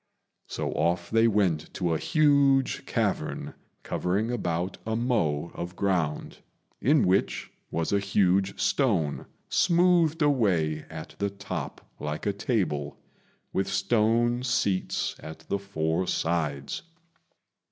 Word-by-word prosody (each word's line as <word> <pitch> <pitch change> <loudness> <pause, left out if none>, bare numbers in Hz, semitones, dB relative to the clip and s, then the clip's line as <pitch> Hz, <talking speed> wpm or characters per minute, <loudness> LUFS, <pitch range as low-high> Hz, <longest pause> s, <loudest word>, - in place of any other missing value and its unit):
So - - -3
off 85 +2 0
they 115 +1 +5
went 95 -8 +1
to 85 -3 0
a 80 - 0
huge 140 -4 +3
cavern, - - -1 0.3
covering 100 +6 -1
about 90 -5 -2
a 110 0 -2
mow 85 - 0
of 85 +1 -6
ground, 90 -7 -1 0.4
in 145 +2 +4
which 95 +2 +1 0.2
was 85 +4 -1
a 100 - +4
huge 100 -1 +1
stone, 95 - +1 0.2
smoothed 170 -2 +3
away 90 - +2
at 80 -1 -8
the 100 0 0
top 100 -6 -6
like 75 0 -4
a 100 - +1
table, 75 - -1 0.6
with 95 - 0
stone 115 +4 +2
seats 115 -7 0
at 80 0 -9
the 100 - 0
four 85 -2 -1
sides. 75 -5 -1
100 Hz, 120 wpm, -27 LUFS, 80-115 Hz, 0.6 s, they